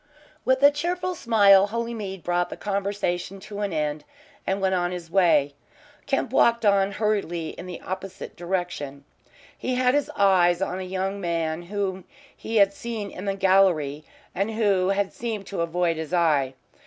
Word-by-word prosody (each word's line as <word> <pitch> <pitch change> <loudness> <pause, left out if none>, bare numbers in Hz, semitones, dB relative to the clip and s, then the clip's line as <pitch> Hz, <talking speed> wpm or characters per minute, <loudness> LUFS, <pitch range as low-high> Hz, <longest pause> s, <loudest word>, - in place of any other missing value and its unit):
With 260 +1 +2
a 285 - +9
cheerful 355 +5 -2
smile 205 - +5
Holymead 220 -4 -4
brought 175 0 0
the - - -7
conversation 195 -2 -2
to 205 +1 -8
an 205 -2 -1
end 150 -1 -2 0.4
and 190 +1 0
went 190 -1 +1
on 175 -1 +1
his 175 -2 -7
way. 170 -6 +3 0.5
Kemp 270 -3 -1
walked 235 -3 +3
on 200 -1 +3
hurriedly 195 -7 -1
in 180 - -9
the 180 - -7
opposite 190 +1 -7
direction. 175 -6 -4 0.5
He 255 - -2
had 250 0 +3
his 290 0 +1
eyes 180 -3 +4
on 190 -1 -2
a 185 0 -6
young 195 +2 -2
man 165 -2 -1
whom 190 0 -3 0.3
he 225 - -6
had 200 -2 +5
seen 215 -2 -5
in 185 - -8
the 195 -1 -1
gallery, 185 -7 +3 0.3
and 195 +4 -1
who 200 -4 +1
had 195 0 0
seemed 220 -4 -4
to 195 -3 -4
avoid 170 0 0
his 160 +2 -3
eye. 145 -6 +2
195 Hz, 165 wpm, -25 LUFS, 175-205 Hz, 0.5 s, a